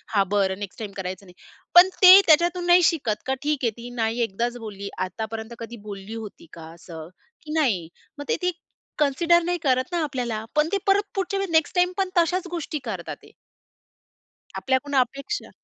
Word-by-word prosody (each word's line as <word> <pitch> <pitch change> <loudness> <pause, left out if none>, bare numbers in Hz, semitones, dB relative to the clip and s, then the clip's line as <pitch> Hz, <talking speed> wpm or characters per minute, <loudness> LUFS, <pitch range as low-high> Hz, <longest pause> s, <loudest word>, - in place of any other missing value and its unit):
हा 200 - +5
बरं 195 -1 +1
next 200 -2 -8
time 215 -3 -6
करायचं 185 0 -6
नाही. 180 - -16 0.4
पण 355 +2 +9
ते 370 +1 +11
त्याच्यातून 345 +2 +3
नाही 350 0 +6
शिकत, 280 -11 0
का 265 - +1
ठीक 295 -1 0
आहे, 230 - +2
ती 235 +1 -8
नाही 225 +2 0
एकदाच 235 +3 -2
बोलली, 200 -3 -7 0.2
आतापर्यंत 220 +4 -6
कधी 230 +1 -8
बोलली 200 +2 -7
होती 215 -6 -9
का 165 - -10
असं? 165 -2 -10 0.3
की 305 - -10
नाही. 195 - 0 0.3
मग 290 - -7
ते - - +2
ती 360 - +2 0.5
कन्सिडर 335 +4 +3
नाही 355 +1 -1
करत 260 +3 +1
ना 345 -2 0
आपल्याला. 245 -6 -3
पण 300 +1 +3
ते 400 - +2
परत 405 +1 +2
पुढच्या 390 +1 -2
वेळ 390 -1 -2
नेक्स्ट 320 +1 +2
टाईमपण 365 +1 +1
तशाच 355 +2 +1
गोष्टी 330 -3 -4
करतात - - -5
ते. - - -18 1.2
आपल्याकडून 270 +2 -1
अपेक्षा 275 - -1
260 Hz, 180 wpm, -24 LUFS, 215-345 Hz, 1.2 s, ते